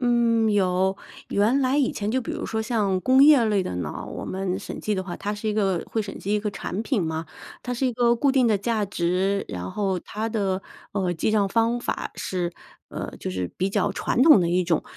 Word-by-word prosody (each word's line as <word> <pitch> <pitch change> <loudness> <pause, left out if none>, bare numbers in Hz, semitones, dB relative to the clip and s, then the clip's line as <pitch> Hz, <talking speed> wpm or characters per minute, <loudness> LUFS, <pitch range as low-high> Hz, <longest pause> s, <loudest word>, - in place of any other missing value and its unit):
嗯， 235 -2 +3
有。 190 -1 +2 0.3
原 225 +7 +3
来 265 +2 +2
以 270 - +2
前 210 +1 -3
就 260 - +1
比 230 - -5
如 - - -4
说 220 - -2
像 210 -5 0
工 260 +6 +5
业 290 -5 +7
类 210 -3 +2
的 90 - -4
呢， 90 - -4
我 - - -6
们 190 0 -2
审 205 - -7
计 215 - -1
的 190 - -2
话 180 -2 -6
它 205 - -3
是 215 +1 -4
一 210 - 0
个 195 -5 +1
会 220 - -1
审 200 - -7
计 205 +2 -1
一 210 - +1
个 210 - -2
产 200 +1 -4
品 230 -4 0
嘛， 160 0 -3 0.4
它 250 - -3
是 255 +2 0
一 250 - 0
个 235 0 +3
固 270 +4 +2
定 260 -2 +4
的 215 -3 +3
价 215 0 0
值， 190 +2 0
然 90 +1 -5
后 195 -3 -1
它 220 +5 -4
的， 195 -4 -1 0.3
呃， 190 -3 0
记 170 +6 0
帐 205 -2 +2
方 230 +3 +1
法 - - -3
是， 175 -2 -2 0.4
呃， - - -6
就 - - -4
是 90 -1 -3
比 190 +2 0
较 - - +1
传 - - -1
统 300 - +8
的 170 - +1
一 180 +1 +2
种。 170 -2 +1
205 Hz, 255 characters per minute, -24 LUFS, 185-230 Hz, 0.4 s, 统